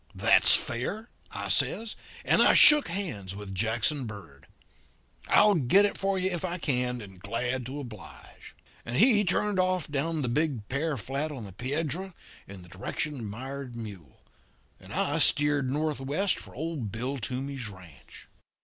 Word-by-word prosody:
"'That's -, -, +6 dB
fair,' 200 Hz, -, -3 dB, 0.2 s
I -, -, -6 dB
says, 225 Hz, 0 st, +1 dB, 0.3 s
and -, -, +3 dB
I -, -, +5 dB
shook 300 Hz, -1 st, +10 dB
hands 105 Hz, -, -5 dB
with 100 Hz, -1 st, -8 dB
Jackson 115 Hz, +7 st, -1 dB
Bird. 95 Hz, -11 st, -11 dB, 0.8 s
'I'll 210 Hz, 0 st, +5 dB
get 175 Hz, +5 st, +4 dB
it 205 Hz, -, -2 dB
for 195 Hz, 0 st, -1 dB
you 185 Hz, 0 st, 0 dB
if 175 Hz, 0 st, -4 dB
I 180 Hz, -1 st, -3 dB
can, 125 Hz, -6 st, -2 dB
and 95 Hz, -3 st, -12 dB
glad 120 Hz, +5 st, -3 dB
to 140 Hz, +3 st, -6 dB
oblige.' 115 Hz, -8 st, -12 dB, 0.3 s
And 115 Hz, -, -6 dB
he 215 Hz, -, +5 dB
turned 200 Hz, +1 st, 0 dB
off 185 Hz, -3 st, 0 dB
down 150 Hz, +2 st, -2 dB
the -, -, -1 dB
big 130 Hz, -4 st, -1 dB
pear 145 Hz, +2 st, -2 dB
flat 135 Hz, +7 st, -3 dB
on 130 Hz, -6 st, -8 dB
the 100 Hz, -3 st, -10 dB
Piedra, 155 Hz, -, -4 dB, 0.3 s
in 95 Hz, -2 st, -11 dB
the -, -, -15 dB
direction 100 Hz, -, -4 dB
of 135 Hz, -, -8 dB
Mired 130 Hz, +4 st, -7 dB
Mule; 100 Hz, -, -10 dB, 0.6 s
and -, -, -15 dB
I -, -, 0 dB
steered 145 Hz, -2 st, +3 dB
northwest 150 Hz, +5 st, -1 dB
for -, -, -13 dB
old 145 Hz, -7 st, -5 dB
Bill 125 Hz, +6 st, -4 dB
Toomey's 130 Hz, +1 st, -5 dB
ranch. 85 Hz, -9 st, -15 dB
135 Hz, 160 wpm, -27 LUFS, 110-165 Hz, 0.8 s, shook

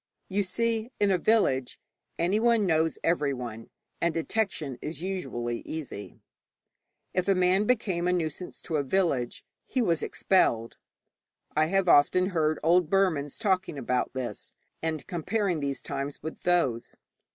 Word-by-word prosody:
You 200 Hz, +1 st, +1 dB
see, 225 Hz, +4 st, -1 dB
in 205 Hz, -1 st, +3 dB
a 185 Hz, -, +2 dB
village 140 Hz, -, +2 dB, 0.4 s
anyone 215 Hz, +5 st, +3 dB
knows 160 Hz, -2 st, +2 dB
everyone, 125 Hz, -9 st, -1 dB, 0.3 s
and 170 Hz, -, +2 dB
detection 165 Hz, -, -2 dB
is 160 Hz, +2 st, -5 dB
usually 120 Hz, -11 st, -3 dB
easy. 150 Hz, -10 st, -7 dB, 1.0 s
If 185 Hz, +1 st, 0 dB
a 195 Hz, -, +4 dB
man 185 Hz, +3 st, +3 dB
became 195 Hz, -7 st, +1 dB
a -, -, +3 dB
nuisance 175 Hz, 0 st, -3 dB
to 160 Hz, -, -1 dB
a 145 Hz, -, +1 dB
village, 140 Hz, -6 st, 0 dB, 0.2 s
he 260 Hz, -, -1 dB
was 170 Hz, -9 st, +2 dB
expelled. 115 Hz, -11 st, +1 dB, 0.8 s
I 155 Hz, +1 st, +3 dB
have 195 Hz, +1 st, +1 dB
often 180 Hz, +5 st, +5 dB
heard 155 Hz, -4 st, +1 dB
old 170 Hz, 0 st, +4 dB
Burmans 165 Hz, -8 st, +1 dB
talking 190 Hz, -7 st, 0 dB
about 125 Hz, -1 st, -1 dB
this, 125 Hz, -5 st, -5 dB, 0.3 s
and 160 Hz, -2 st, -2 dB
comparing 180 Hz, 0 st, -1 dB
these 140 Hz, -2 st, -3 dB
times 140 Hz, +1 st, -4 dB
with 160 Hz, -, -6 dB
those. 140 Hz, -10 st, +1 dB
170 Hz, 140 wpm, -28 LUFS, 140-190 Hz, 1.0 s, often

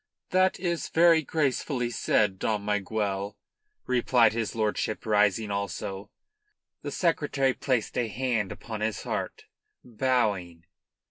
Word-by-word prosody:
"That 185 Hz, 0 st, +3 dB
is 170 Hz, -2 st, -2 dB
very 165 Hz, -1 st, +5 dB
gracefully 135 Hz, -4 st, -1 dB
said, 105 Hz, -3 st, +1 dB
Dom 105 Hz, -2 st, -1 dB
Miguel," 100 Hz, -1 st, -2 dB, 0.5 s
replied 120 Hz, -3 st, +3 dB
his 115 Hz, -1 st, -2 dB
lordship, 110 Hz, -1 st, -1 dB
rising 105 Hz, 0 st, +2 dB
also. 100 Hz, 0 st, -4 dB, 0.7 s
The -, -, -4 dB
Secretary 145 Hz, -6 st, +1 dB
placed 125 Hz, -6 st, -1 dB
a 120 Hz, -, 0 dB
hand 115 Hz, -3 st, -1 dB
upon 110 Hz, -2 st, -7 dB
his 110 Hz, 0 st, -2 dB
heart, -, -, -4 dB, 0.4 s
bowing. 105 Hz, -9 st, -1 dB
110 Hz, 115 wpm, -27 LUFS, 105-130 Hz, 0.7 s, very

